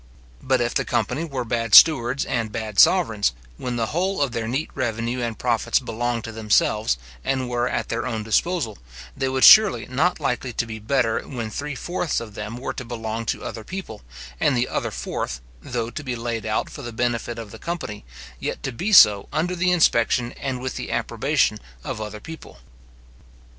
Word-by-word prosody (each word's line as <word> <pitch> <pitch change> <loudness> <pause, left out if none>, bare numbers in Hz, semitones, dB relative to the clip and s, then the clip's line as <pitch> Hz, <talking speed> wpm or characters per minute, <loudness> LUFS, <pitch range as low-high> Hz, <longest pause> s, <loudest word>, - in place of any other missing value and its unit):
But - - +1
if - - 0
the - - +1
company 160 - -1
were 135 -6 -4
bad 115 -2 +1
stewards 135 -4 +7
and 115 -3 -2
bad 110 -3 -3
sovereigns, 110 - +4 0.2
when 125 -1 -4
the 115 -1 0
whole 190 +4 0
of 135 - -1
their 115 -1 -3
neat 135 +7 -2
revenue 120 -1 -2
and 115 -2 -3
profits 120 -3 +1
belonged 120 -1 -2
to 115 - -6
themselves, 105 - +1 0.3
and 130 -2 -1
were 120 0 0
at - - -2
their 115 +1 -2
own 110 -3 -3
disposal, 115 - 0 0.4
they 135 -1 -1
were 130 0 0
surely 215 -2 +8
not 145 +9 0
likely 125 -3 -2
to 115 - -1
be 110 -1 -7
better 115 +1 +1
when 115 -5 -5
three 145 +4 -4
fourths 175 +3 -2
of 115 -3 -9
them 105 +3 -6
were 125 - -4
to 130 - -6
belong 115 -1 -5
to - - -2
other 110 - -6
people, 185 - -7 0.4
and 130 - +2
the 120 - +1
other - - -2
fourth, - - -4 0.2
though 120 -2 -3
to 145 - -6
be 130 -3 -3
laid 115 -1 -4
out 110 - 0
for - - -8
the 120 -3 -6
benefit 120 0 -2
of 110 -3 -8
the - - -11
company, 170 -11 -5 0.4
yet - - -4
to 135 - -2
be 185 - -3
so 105 - +7
under 165 +4 -1
the 180 +1 +1
inspection 125 -8 +3
and 135 -3 -4
with 130 +1 -4
the - - -5
approbation - - 0 0.2
of 110 - -5
other 105 0 -6
people. 160 - -11
120 Hz, 195 wpm, -23 LUFS, 110-135 Hz, 0.4 s, surely